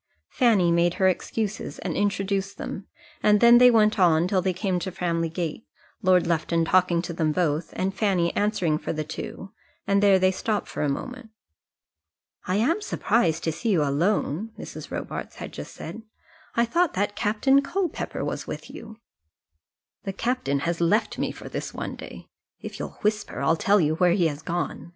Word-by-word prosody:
Fanny 210 -9 +3
made 170 +1 +2
her 190 - +3
excuses 210 +3 -2
and - - -4
introduced 200 -1 -1
them, 195 - -6 0.3
and 210 0 +4
then 235 +1 +7
they 250 0 +8
went 215 -3 +3
on 170 -2 +4
till 185 0 +1
they 190 0 0
came 185 0 -1
to 190 +1 -4
Framley 170 -2 -1
Gate, 165 +4 -4 0.3
Lord 185 -3 +4
Lufton 165 0 +1
talking 175 -1 +3
to 170 - -5
them 160 -2 0
both, 160 -1 0
and 190 +1 -1
Fanny 195 -4 +1
answering 185 -7 +1
for - - -3
the 155 -1 -2
two, 160 +5 -7 0.3
and 200 0 +2
there 200 -2 +6
they 185 0 +3
stopped 210 +2 -2
for - - -5
a 150 - +1
moment. 250 - -5 1.2
"I 185 - 0
am 285 - +1
surprised 175 - 0
to 160 - 0
see 230 +9 -3
you 175 -7 +3
alone," 165 +6 0
Mrs. - - -8
Robarts - - -5
had - - -7
just - - -8
said; 225 - -8 0.5
"I 235 - +3
thought 340 +7 +1
that 205 +2 -1
Captain 235 +6 +3
Culpepper 350 +5 -3
was - - -4
with - - -7
you." 220 -1 -10 1.1
"The 195 - -3
captain 215 - -1
has 170 +2 -2
left 205 +7 +1
me - - -1
for - - -10
this - - -5
one - - -4
day. - - -10 0.3
If - - -8
you'll - - -6
whisper 210 -5 -1
I'll 140 +4 +3
tell 200 +5 +3
you 155 -3 +2
where 175 +1 +3
he 180 -2 +2
has 145 0 -7
gone. 175 0 -4
190 Hz, 185 wpm, -25 LUFS, 170-215 Hz, 1.2 s, they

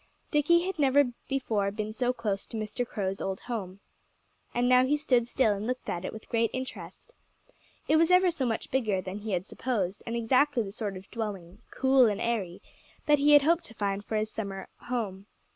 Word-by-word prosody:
Dickie 340 +4 +4
had 380 -3 -4
never 280 -2 +4 0.2
before 225 -7 0
been 215 +1 -4
so 245 +2 +1
close 215 -5 -3
to 225 - -6
Mr. 215 +3 -3
Crow's 195 -2 -3
old 190 -1 -3
home. 200 -5 -5 0.7
And 245 +1 +1
now 250 0 +6
he 285 +3 +2
stood 250 -5 +2
still 240 -4 +2
and 205 +2 -4
looked 255 +1 -3
at 175 - -4
it - - -4
with 220 - -10
great 230 -1 +1
interest. 260 - -7 0.7
It 315 - +4
was 330 +1 +4
ever 365 0 +5
so 275 -7 -1
much 225 -1 -3
bigger 220 -7 +1
than 185 +2 -5
he 210 -1 -4
had 180 0 -1
supposed, 205 -6 -2
and 230 - -2
exactly 255 +2 +2
the 195 - -7
sort 205 -2 -4
of 185 - -13
dwelling 200 -6 -5
cool 265 -2 +4
and 205 -2 -1
airy 200 -7 -2 0.4
that 295 -1 +4
he 295 +1 +5
had 290 -1 +8
hoped 335 +3 +3
to 225 - -11
find 200 -1 -2
for 220 - -4
his 215 0 -1
summer 195 -3 -5
home. 210 -5 -4
230 Hz, 205 wpm, -28 LUFS, 200-265 Hz, 0.7 s, had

